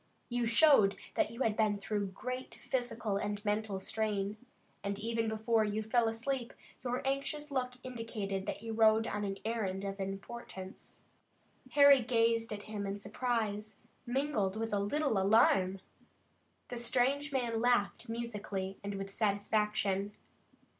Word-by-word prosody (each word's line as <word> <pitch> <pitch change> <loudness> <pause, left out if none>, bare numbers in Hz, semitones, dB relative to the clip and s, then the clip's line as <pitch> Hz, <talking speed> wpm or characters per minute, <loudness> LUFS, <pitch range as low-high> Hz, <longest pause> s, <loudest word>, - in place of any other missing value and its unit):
You 240 -1 0
showed 230 -5 +6 0.2
that - - +2
you 230 +3 -7
had 220 -2 +1
been 215 -2 +2
through 205 0 -2
great 255 +7 -5
physical 235 -5 -2
and 205 +1 -3
mental 210 -1 0
strain, 205 0 -1 0.5
and 200 0 -2
even 225 +1 -1
before 220 +1 +2
you 215 +1 -1
fell 230 +1 +2
asleep 240 +2 -2 0.3
your 250 0 -2
anxious 280 +2 -2
look 250 -2 -1
indicated 220 -6 -4
that - - -4
you 225 -1 -4
rode 220 0 +5
on 210 -2 -2
an 195 -1 -2
errand 200 -4 -1
of 195 0 -4
importance." 195 0 -7 0.7
Harry 280 -2 +8
gazed 230 -1 +2
at 205 -1 -4
him 205 -2 -4
in 200 +1 -3
surprise, 215 -1 -2 0.3
mingled 240 -6 0
with 225 -1 -2
a 205 - +2
little 225 +2 +1
alarm. 195 -2 +4 0.9
The 245 - -4
strange 260 +5 +1
man 240 -4 0
laughed 240 -1 +1
musically 205 -5 -4
and 200 0 -3
with 195 0 -5
satisfaction. 205 -1 +1
220 Hz, 140 wpm, -33 LUFS, 200-240 Hz, 0.9 s, Harry